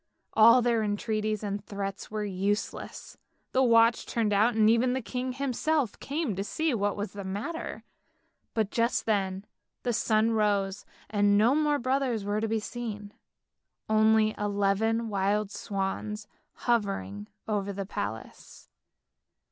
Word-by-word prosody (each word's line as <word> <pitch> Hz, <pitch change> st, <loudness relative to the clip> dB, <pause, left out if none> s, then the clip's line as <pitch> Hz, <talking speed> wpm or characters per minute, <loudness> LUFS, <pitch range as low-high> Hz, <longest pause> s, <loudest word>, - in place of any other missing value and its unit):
All 230 Hz, +3 st, +7 dB
their 235 Hz, -2 st, +2 dB
entreaties 215 Hz, 0 st, -1 dB
and 200 Hz, -1 st, -3 dB
threats 200 Hz, -1 st, -5 dB
were 215 Hz, 0 st, -3 dB
useless, 200 Hz, +2 st, -3 dB, 0.3 s
the 260 Hz, -, +3 dB
watch 230 Hz, -2 st, +4 dB
turned 220 Hz, -3 st, 0 dB
out 220 Hz, +4 st, +3 dB
and 215 Hz, -1 st, +4 dB
even 235 Hz, +3 st, +3 dB
the 260 Hz, -, -1 dB
king 255 Hz, +2 st, -3 dB
himself 275 Hz, -1 st, -1 dB
came 280 Hz, -, -2 dB
to 195 Hz, -, -2 dB
see 315 Hz, +8 st, -1 dB
what 205 Hz, -2 st, 0 dB
was 205 Hz, -1 st, -4 dB
the 200 Hz, -1 st, -6 dB
matter; 205 Hz, -, -5 dB, 0.7 s
but 220 Hz, -3 st, 0 dB
just 235 Hz, +1 st, +1 dB
then 195 Hz, -2 st, 0 dB, 0.4 s
the 245 Hz, -, 0 dB
sun 220 Hz, 0 st, +2 dB
rose, 205 Hz, -2 st, 0 dB, 0.2 s
and 205 Hz, -1 st, +3 dB
no 225 Hz, +5 st, +5 dB
more 300 Hz, -1 st, +2 dB
brothers 255 Hz, -4 st, 0 dB
were 205 Hz, +1 st, 0 dB
to 225 Hz, -, 0 dB
be 220 Hz, 0 st, 0 dB
seen, 210 Hz, -3 st, -6 dB, 0.7 s
only 215 Hz, 0 st, +4 dB
eleven 205 Hz, +3 st, +1 dB
wild 205 Hz, 0 st, 0 dB
swans 205 Hz, +1 st, -3 dB, 0.3 s
hovering 105 Hz, -, -1 dB, 0.2 s
over 205 Hz, -2 st, -1 dB
the 195 Hz, 0 st, -4 dB
palace. 110 Hz, -, -7 dB
215 Hz, 140 wpm, -28 LUFS, 200-235 Hz, 0.7 s, All